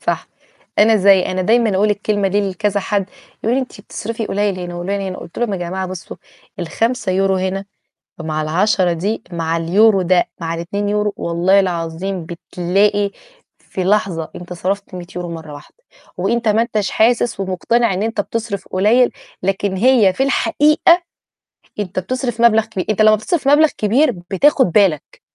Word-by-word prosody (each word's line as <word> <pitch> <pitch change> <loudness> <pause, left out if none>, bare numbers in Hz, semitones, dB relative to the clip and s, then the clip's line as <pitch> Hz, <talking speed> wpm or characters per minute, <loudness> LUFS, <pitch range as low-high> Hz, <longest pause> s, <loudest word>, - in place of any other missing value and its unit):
صح، - - -2 0.5
أنا 220 +1 +5
زي 195 -1 +5
أنا 185 0 -2
دايمًا 225 0 +2
أقول 210 +2 +2
الكلمة 205 -1 0
دي 200 0 0
لكذا 205 +1 -1
حد 200 +1 -2 0.3
يقول 230 +3 +2
لي - - +2
أنتِ 250 - -10
بتصرفي 225 +2 -5
قليل 200 -1 -1
هنا 175 0 -6
وقليل 195 +3 -3
هنا، 190 -1 -5
قلت 170 - -10
لهم: 240 -4 -1
"يا 195 - -2
جماعة 185 +2 -3
بصُّوا، 185 -1 -8 0.4
ال5€ 195 0 0
هنا 190 +1 -2 0.6
مع 155 -1 -2
ال10 180 +3 +1
دي 200 +7 -2
مع 165 -1 -1
اليورو 195 +4 +3
ده 180 0 +2
مع 165 0 -3
ال2€ 205 +4 -2
والله 175 +4 +2
العظيم 175 0 -3
بتلاقي 195 +4 0 0.5
في 185 - -5
لحظة 190 -5 0
أنت 180 0 -9
صرَفت 195 +3 -3
100€ 180 0 -7
مرّه 160 -2 -9
واحدة، 435 - -14 0.3
وأنت 235 -1 0
ما 220 +2 +3
أنتش 215 -4 -2
حاسس 235 -1 +1
ومقتنع 195 +4 0
إن 190 - -2
أنت 225 -1 -1
بتصرِف 225 -2 -4
قليّل، 220 +7 +3 0.3
لكن 195 +1 -1
هي 225 -2 +4
في 260 - -2
الحقيقة، 305 +5 +3 0.8
أنت 190 -3 -3
بتصرف 240 +4 -3
مبلغ 225 -2 +5
كبير، 185 - -5
أنت 215 0 +2
لمّا 215 0 +6
بتصرف 275 - -2
مبلغ 305 +2 +6
كبير 250 +7 +2 0.2
بتاخد 260 - +3
بالك. 185 -7 +1
200 Hz, 160 wpm, -18 LUFS, 180-220 Hz, 0.8 s, لمّا